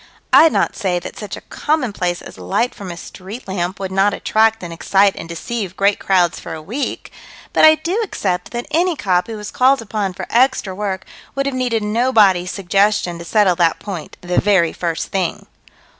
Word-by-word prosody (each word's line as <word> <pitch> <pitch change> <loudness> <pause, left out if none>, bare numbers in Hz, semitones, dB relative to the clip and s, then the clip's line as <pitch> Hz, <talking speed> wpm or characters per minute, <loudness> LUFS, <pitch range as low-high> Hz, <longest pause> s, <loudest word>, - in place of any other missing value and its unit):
I'd 320 - +8
not - - 0
say 185 -5 -1
that 175 - -7
such 210 - -6
a - - -10
commonplace 210 - -1
as - - -11
light 90 - 0
from 195 -2 -8
a 170 - -6
street 200 +7 -9
lamp 185 0 -3
would 190 -1 -4
not 195 +2 +2
attract 220 -1 +2
and 170 -1 -6
excite 195 +3 +2
and 165 - -8
deceive 190 +2 -5
great 200 0 +2
crowds 180 -3 +2
for - - -7
a - - -7
week 225 - -4 0.4
but - - +6
I 315 0 +8
do 345 +8 -2
accept 190 - -2
that 240 0 -4
any 350 +1 +2
cop 180 -8 +1
who 225 -1 -6
was 210 0 -7
called 265 +2 +4
upon 210 -4 -3
for - - -6
extra 245 -5 +2
work 190 -1 -3 0.3
would 275 0 0
have 275 - -1
needed 245 -4 0
nobody's 210 -5 +3
suggestion 195 -2 +1
to 170 - -8
settle 200 -1 +3
that 165 -2 +3
point 190 -6 -7
the 180 0 0
very 190 -5 +3
first 170 -2 -3
thing. 190 -3 -2
200 Hz, 195 wpm, -18 LUFS, 180-235 Hz, 0.4 s, I'd